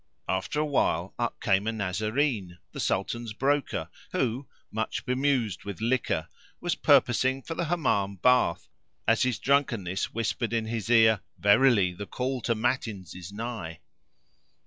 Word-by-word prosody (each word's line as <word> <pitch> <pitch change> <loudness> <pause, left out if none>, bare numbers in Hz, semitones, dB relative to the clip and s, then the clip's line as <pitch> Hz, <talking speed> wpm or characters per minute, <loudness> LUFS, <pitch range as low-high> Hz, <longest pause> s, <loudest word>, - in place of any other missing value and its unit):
After 95 +10 -1
a 155 - +2
while 145 -3 0
up - - -2
came 95 +2 +2
a - - +2
Nazarene,[FN#503] 105 0 -1
the - - -8
Sultan's 120 -2 -1
broker 140 +4 0 0.3
who, 130 +3 -1 0.2
much 110 +1 -3
bemused 125 -6 0
with 100 -2 -6
liquor, 120 +3 0 0.3
was 175 - 0
purposing 130 -1 +3
for 165 - -5
the 170 - -2
Hammam 105 - 0
bath 125 -3 +2 0.4
as 115 - +4
his 125 -3 +1
drunkenness 115 -10 0
whispered 115 +1 -2
in 115 -1 0
his 110 -1 -4
ear, 110 -3 +6 0.2
"Verily 100 -3 +4
the 100 +3 -7
call 130 0 -2
to 115 - 0
matins[FN#504] 110 -6 -2
is 90 +1 -8
nigh." 105 -7 -5
115 Hz, 145 wpm, -27 LUFS, 100-130 Hz, 0.4 s, ear